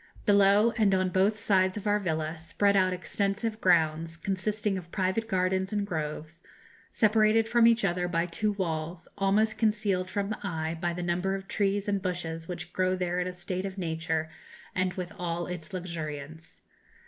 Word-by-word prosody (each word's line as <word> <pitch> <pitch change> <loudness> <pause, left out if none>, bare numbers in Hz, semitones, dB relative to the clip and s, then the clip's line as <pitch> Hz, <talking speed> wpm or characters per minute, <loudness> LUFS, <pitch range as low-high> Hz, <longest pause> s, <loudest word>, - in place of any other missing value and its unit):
Below, 205 +2 +5
and 200 -3 +4
on 185 0 +1
both 195 +4 +2
sides 190 -2 +2
of 210 - -6
our 205 0 +3
villa, 160 -4 -2
spread 200 +5 +1
out 185 -1 +4
extensive 200 +4 -2
grounds, 165 -2 +2
consisting 200 +3 -1
of 175 -2 -7
private 190 +4 0
gardens 190 -1 0
and 205 -1 0
groves, 155 -2 -5 0.5
separated 215 +1 +3
from 235 0 +5
each 230 -2 +4
other 180 -1 0
by 170 -1 0
two 210 +5 -1
walls, 170 -3 -3
almost 210 +2 +2
concealed 210 -4 +1
from 200 0 -2
the 215 - -3
eye 160 -4 -2
by 175 -1 0
the 175 +1 -4
number 180 +3 0
of 195 0 -7
trees 200 0 0
and 200 -1 0
bushes 165 -3 -3
which 180 0 -6
grow 185 0 +1
there 180 -1 -1
in 180 - -1
a - - -3
state 180 +1 -4
of 190 0 -8
nature 160 -2 -1 0.5
and 185 -1 0
with 180 -2 -5
all 175 -1 -2
its 175 -3 -7
luxuriance. 160 -3 -6
185 Hz, 175 wpm, -28 LUFS, 170-200 Hz, 0.5 s, Below